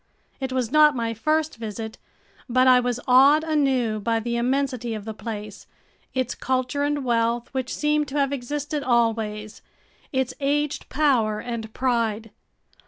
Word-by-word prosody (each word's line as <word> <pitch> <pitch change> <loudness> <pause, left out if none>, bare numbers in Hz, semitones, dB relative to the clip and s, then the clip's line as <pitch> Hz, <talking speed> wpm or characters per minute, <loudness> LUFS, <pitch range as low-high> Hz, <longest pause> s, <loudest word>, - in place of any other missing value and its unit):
It 265 -1 -3
was 255 -3 -1
not 300 -1 +6
my 230 -2 -1
first 310 +7 0
visit, 220 0 -6 0.5
but 255 +1 +3
I 255 -1 +7
was 245 -1 -1
awed 275 +5 +6
anew 265 -8 +1
by 230 +2 0
the 235 +1 -3
immensity 250 -1 -1
of 210 -1 -7
the 220 - -5
place, 210 -2 -7 0.5
its 255 -2 0
culture 255 +2 -1
and 290 -1 -1
wealth 235 0 0
which 260 -1 -3
seemed 300 0 +1
to 275 +2 -4
have 280 -1 +1
existed 290 +3 -3
always, 225 -4 0 0.5
its 265 -2 -1
aged 290 +1 -1
power 245 -8 +2
and 230 -2 -5
pride. 230 -4 0
250 Hz, 150 wpm, -24 LUFS, 230-280 Hz, 0.5 s, I